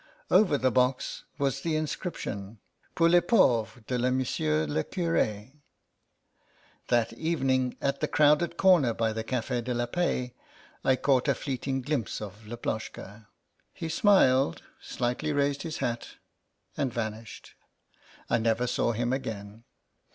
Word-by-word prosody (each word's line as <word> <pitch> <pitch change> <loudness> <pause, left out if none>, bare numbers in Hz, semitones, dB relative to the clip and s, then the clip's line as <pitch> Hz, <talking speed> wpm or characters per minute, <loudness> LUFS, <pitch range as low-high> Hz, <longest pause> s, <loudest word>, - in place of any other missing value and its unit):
Over 180 -9 +5
the 130 -1 +1
box 125 +2 0
was 135 -1 -1
the 160 0 -1
inscription, 115 - -4 0.4
Pour 165 - +4
les 175 +1 +6
pauvres 120 - +2
de 125 - -5
M. 125 +1 +2 0.5
le 80 +1 0
Curd" 130 - -1 1.4
That 120 -2 +1
evening, 130 -6 0
at 140 0 -1
the 150 - 0
crowded 150 +4 +3
corner 170 -12 +4
by 110 -1 0
the 110 0 -3
Cafd 120 0 -2
de 125 -1 -2
la 120 0 0
Paix, 125 -3 -1 0.5
I 130 - +4
caught 130 -1 +2
a - - +3
fleeting 135 -1 -3
glimpse 135 -7 -2
of 105 +1 -9
Laploshka. 110 -2 -6 0.5
He 165 - -5
smiled, 145 - +3 0.2
slightly 125 +5 -2
raised 140 0 +1
his 160 -2 -5
hat, 120 -3 -3 0.6
and 135 -3 -1
vanished. 110 -1 -6 0.7
I 120 - +2
never 115 +2 +1
saw 120 -1 0
him 120 +2 -1
again. 110 -3 -6
125 Hz, 135 wpm, -28 LUFS, 115-145 Hz, 1.4 s, les